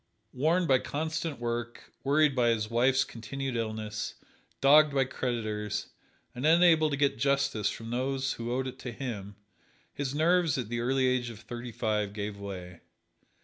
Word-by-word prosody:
Worn 160 Hz, +7 st, +2 dB
by 130 Hz, -4 st, +4 dB
constant 160 Hz, +1 st, -3 dB
work, 120 Hz, 0 st, -4 dB
worried 145 Hz, +1 st, +3 dB
by 120 Hz, -2 st, +3 dB
his 110 Hz, -1 st, 0 dB
wife's 130 Hz, +3 st, +3 dB
continued 130 Hz, +3 st, -5 dB
illness, 110 Hz, -1 st, -3 dB, 0.4 s
dogged 145 Hz, +1 st, +6 dB
by 135 Hz, -1 st, +3 dB
creditors, 110 Hz, -5 st, -3 dB, 0.4 s
and 125 Hz, -, -6 dB
unable 160 Hz, 0 st, +5 dB
to 140 Hz, -, -1 dB
get 140 Hz, -5 st, +1 dB
justice 140 Hz, -5 st, +1 dB
from 115 Hz, 0 st, -7 dB
those 135 Hz, +2 st, -1 dB
who 115 Hz, +1 st, -5 dB
owed 130 Hz, +1 st, 0 dB
it 130 Hz, -, -6 dB
to 125 Hz, -, -5 dB
him, 110 Hz, -5 st, -6 dB, 0.6 s
his 140 Hz, -1 st, -3 dB
nerves 165 Hz, -1 st, +3 dB
at 120 Hz, -5 st, -3 dB
the 120 Hz, 0 st, -2 dB
early 130 Hz, +2 st, +1 dB
age 125 Hz, -1 st, +1 dB
of 115 Hz, -1 st, -10 dB
thirty 120 Hz, +1 st, -7 dB
five 105 Hz, -3 st, -1 dB
gave 105 Hz, 0 st, -4 dB
way. 90 Hz, -3 st, -7 dB
125 Hz, 160 wpm, -29 LUFS, 115-140 Hz, 0.6 s, dogged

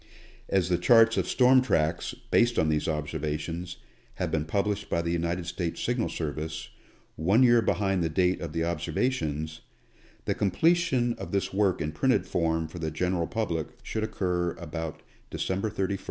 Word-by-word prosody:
As 95 Hz, -2 st, +2 dB
the 90 Hz, -1 st, +2 dB
charts 115 Hz, +5 st, +6 dB
of -, -, 0 dB
storm 130 Hz, 0 st, +5 dB
tracks, 85 Hz, -2 st, 0 dB, 0.2 s
based 120 Hz, 0 st, +3 dB
on 80 Hz, -, +3 dB
these 75 Hz, -1 st, 0 dB
observations, 75 Hz, +3 st, -3 dB, 0.4 s
have -, -, -2 dB
been 75 Hz, -1 st, 0 dB
published 100 Hz, +5 st, -1 dB
by 85 Hz, -, +1 dB
the 85 Hz, -, -1 dB
United 85 Hz, +1 st, -1 dB
States 85 Hz, -1 st, -3 dB
Signal 120 Hz, -1 st, 0 dB
Service 80 Hz, 0 st, -4 dB, 0.5 s
one 95 Hz, +11 st, +4 dB
year 120 Hz, -2 st, +6 dB
behind 95 Hz, -4 st, +1 dB
the 80 Hz, -, 0 dB
date 90 Hz, +3 st, +1 dB
of 85 Hz, -3 st, -4 dB
the 80 Hz, +1 st, -1 dB
observations, 80 Hz, -, -2 dB, 0.6 s
the -, -, +1 dB
completion 130 Hz, -, +2 dB
of -, -, -6 dB
this 95 Hz, -1 st, -1 dB
work 100 Hz, -2 st, +2 dB
in 75 Hz, 0 st, -2 dB
printed 105 Hz, -, +1 dB
form 80 Hz, -2 st, 0 dB
for 85 Hz, +3 st, -9 dB
the 80 Hz, -1 st, -2 dB
general 85 Hz, +2 st, -1 dB
public 85 Hz, -9 st, -2 dB, 0.2 s
should 110 Hz, -, -3 dB
occur 90 Hz, -5 st, -1 dB
about 80 Hz, -1 st, -6 dB, 0.3 s
December 95 Hz, +3 st, -2 dB
31, 95 Hz, -2 st, -2 dB
1888. 100 Hz, -1 st, -2 dB
90 Hz, 170 wpm, -28 LUFS, 80-105 Hz, 0.6 s, charts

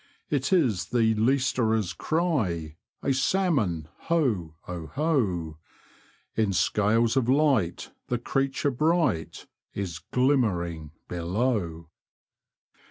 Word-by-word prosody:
It 145 Hz, +1 st, 0 dB
is 130 Hz, -, +2 dB
the 115 Hz, -2 st, +2 dB
leisterers' 110 Hz, -5 st, +1 dB
cry! 105 Hz, -, -1 dB, 0.3 s
A 135 Hz, -, +2 dB
salmon, 130 Hz, -, +1 dB, 0.2 s
ho! 115 Hz, -, 0 dB
oho! 90 Hz, -, -1 dB, 0.8 s
In 110 Hz, -3 st, +1 dB
scales 105 Hz, +6 st, +2 dB
of 130 Hz, -2 st, +1 dB
light, 130 Hz, -, +2 dB, 0.2 s
the 125 Hz, -, 0 dB
creature 135 Hz, +3 st, 0 dB
bright 150 Hz, -, 0 dB, 0.3 s
Is 90 Hz, -5 st, -4 dB
glimmering 90 Hz, -, 0 dB, 0.2 s
below. 85 Hz, -2 st, -2 dB
110 Hz, 90 wpm, -27 LUFS, 85-135 Hz, 0.8 s, is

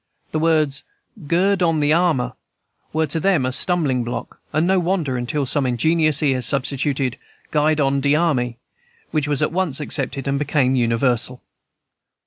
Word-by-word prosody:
The 155 Hz, -, -1 dB
words, 155 Hz, -4 st, +1 dB, 0.5 s
"Gird 190 Hz, +4 st, +2 dB
on 165 Hz, -3 st, +2 dB
the 150 Hz, +1 st, +3 dB
armor," 165 Hz, -7 st, +1 dB, 0.6 s
were 160 Hz, +1 st, +1 dB
to 155 Hz, +2 st, -2 dB
them 175 Hz, -6 st, +2 dB
a 130 Hz, -, -1 dB
stumbling 140 Hz, -5 st, +1 dB
block, 120 Hz, 0 st, -6 dB
and 155 Hz, +3 st, +1 dB
no 190 Hz, +1 st, +3 dB
wonder, 170 Hz, -7 st, -1 dB
until 125 Hz, +4 st, -2 dB
some 135 Hz, +1 st, 0 dB
ingenious 155 Hz, +5 st, +2 dB
ear 135 Hz, -3 st, +2 dB
substituted, 135 Hz, +1 st, -1 dB, 0.3 s
"Guide 155 Hz, 0 st, +2 dB
on 140 Hz, -1 st, +1 dB
de 140 Hz, +1 st, +3 dB
army," 130 Hz, -8 st, 0 dB, 0.5 s
which 150 Hz, -2 st, 0 dB
was 145 Hz, -2 st, +1 dB
at -, -, 0 dB
once 170 Hz, -5 st, -1 dB
accepted, 140 Hz, -2 st, -3 dB
and 140 Hz, 0 st, 0 dB
became 140 Hz, -3 st, +1 dB
universal. 120 Hz, +1 st, 0 dB
145 Hz, 155 wpm, -21 LUFS, 130-160 Hz, 0.6 s, the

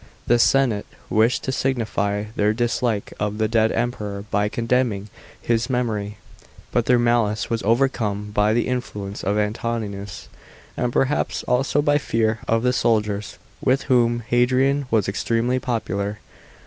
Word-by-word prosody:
The 120 Hz, 0 st, +3 dB
senate 120 Hz, -5 st, +3 dB, 0.2 s
wished 110 Hz, +3 st, +2 dB
to 130 Hz, -, -1 dB
signify 110 Hz, -6 st, -1 dB
their 105 Hz, +1 st, +2 dB
dislike 120 Hz, -2 st, -1 dB
of 105 Hz, 0 st, -2 dB
the 110 Hz, 0 st, +1 dB
dead 110 Hz, 0 st, +2 dB
Emperor 105 Hz, -4 st, -2 dB
by 105 Hz, 0 st, +1 dB
condemning 115 Hz, -3 st, 0 dB, 0.3 s
his 115 Hz, +2 st, 0 dB
memory, 110 Hz, -5 st, -2 dB, 0.5 s
but 120 Hz, -, +1 dB
their 125 Hz, -, +5 dB
malice 120 Hz, -3 st, +1 dB
was 115 Hz, -, 0 dB
overcome 110 Hz, -3 st, 0 dB
by 105 Hz, +1 st, +3 dB
the 120 Hz, -, +1 dB
influence 105 Hz, -6 st, -4 dB
of 100 Hz, +2 st, 0 dB
Antoninus, 105 Hz, -2 st, -3 dB, 0.5 s
and 125 Hz, -1 st, -1 dB
perhaps 135 Hz, +4 st, 0 dB
also 135 Hz, +3 st, +1 dB
by 145 Hz, 0 st, +3 dB
fear 115 Hz, -4 st, 0 dB
of 115 Hz, 0 st, +1 dB
the 125 Hz, 0 st, +2 dB
soldiers, 105 Hz, -4 st, 0 dB, 0.3 s
with 130 Hz, +1 st, +2 dB
whom 120 Hz, -2 st, +2 dB
Hadrian 130 Hz, +3 st, +2 dB
was 110 Hz, -5 st, +2 dB
extremely 115 Hz, +5 st, 0 dB
popular. 105 Hz, -4 st, -2 dB
115 Hz, 140 wpm, -22 LUFS, 105-125 Hz, 0.5 s, their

